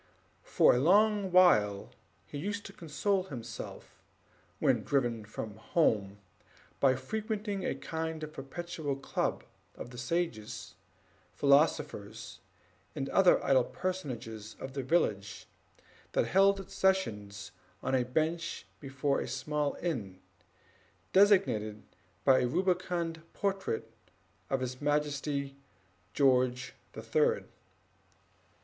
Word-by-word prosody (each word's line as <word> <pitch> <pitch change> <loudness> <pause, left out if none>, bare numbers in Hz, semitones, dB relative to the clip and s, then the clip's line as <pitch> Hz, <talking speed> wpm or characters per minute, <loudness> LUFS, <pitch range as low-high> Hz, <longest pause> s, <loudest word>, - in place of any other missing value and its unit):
For - - +4
a 125 - +2
long 200 +5 +4
while 105 - +4 0.3
he 145 - -7
used 205 +5 -3
to 195 - -9
console 185 +4 -1
himself, 120 -9 -8 0.6
when - - +2
driven 120 -6 0
from 105 0 -7
home, 105 - +1 0.6
by 130 -2 +4
frequenting 210 - -3
a - - -1
kind 160 -1 -4
of 155 0 -6
perpetual 150 +1 -4
club 135 - -2 0.3
of 120 - -8
the 125 - -8
sages, 115 -7 -3 0.6
philosophers, 140 -5 +1 0.6
and 140 -2 -3
other 190 -2 +4
idle 130 -2 +5
personages 125 - -5
of 130 - -7
the 135 - -2
village, 110 - 0 0.7
which - - +2
held 195 +1 +5
its 195 - -9
sessions 105 - 0 0.3
on - - -1
a 130 - +4
bench 160 +4 -1
before 135 +2 -1
a - - -4
small 145 +3 -1
inn, 105 - -3 0.9
designated 185 - +4 0.4
by 130 -1 +6
a 125 - +1
rubicund 175 0 0
portrait 195 - -2 0.6
of 135 -1 0
His 125 +1 -4
Majesty 145 -1 -1 0.6
George 130 -2 +2 0.2
the - - -8
Third. 465 +1 +1
140 Hz, 110 wpm, -31 LUFS, 120-180 Hz, 0.9 s, by